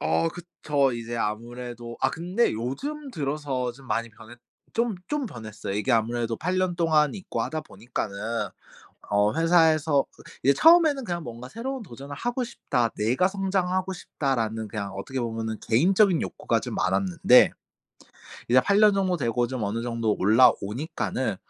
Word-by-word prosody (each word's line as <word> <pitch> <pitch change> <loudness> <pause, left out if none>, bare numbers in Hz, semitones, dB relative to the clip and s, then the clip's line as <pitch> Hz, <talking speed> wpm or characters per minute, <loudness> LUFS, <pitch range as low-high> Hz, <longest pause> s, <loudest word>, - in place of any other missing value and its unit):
어 80 +1 +1
그쵸. 145 - -1
이제 120 0 -5
아무래도 120 +2 -5
아 - - +2
근데 180 +8 0
요즘 275 - -4
들어서 140 -4 -2
좀 135 +2 -16
많이 115 -1 -1
변했 115 +2 -14 0.4
좀 230 -1 +1
좀 295 -2 -1
변했어요. 110 - -7
이게 105 +6 -1
아무래도 115 0 0
8 180 +2 -1
년 185 -2 0
동안 155 -4 +3
있고 190 - -5
하다 155 -1 -3
보니까는 110 -3 -5 1.0
어 105 +1 +2
회사에서 160 -3 +3 0.4
이제 140 - +5
처음에는 320 - +5
그냥 175 -5 -3
뭔가 120 +1 -8
'새로운 255 - -5
도전을 140 - -9
하고 245 - -2
싶다. 125 - -1
내가 125 - +2
성장하고 190 -1 -1
싶다.'라는 115 - -2
그냥 100 -2 -5
어떻게 130 +7 -4
보면은 110 -2 -3
개인적인 185 - +3
욕구가 - - -1
좀 - - -6
많았는데 95 -1 +4 1.0
이제 125 +2 +6
8 200 +10 +2
년 210 -1 +6
정도 190 -2 +1
되고 120 -4 0
좀 125 -2 -4
어느 110 +3 -2
정도 115 -3 -1
올라오니까는 115 - +2
130 Hz, 330 characters per minute, -26 LUFS, 115-180 Hz, 1.0 s, 이제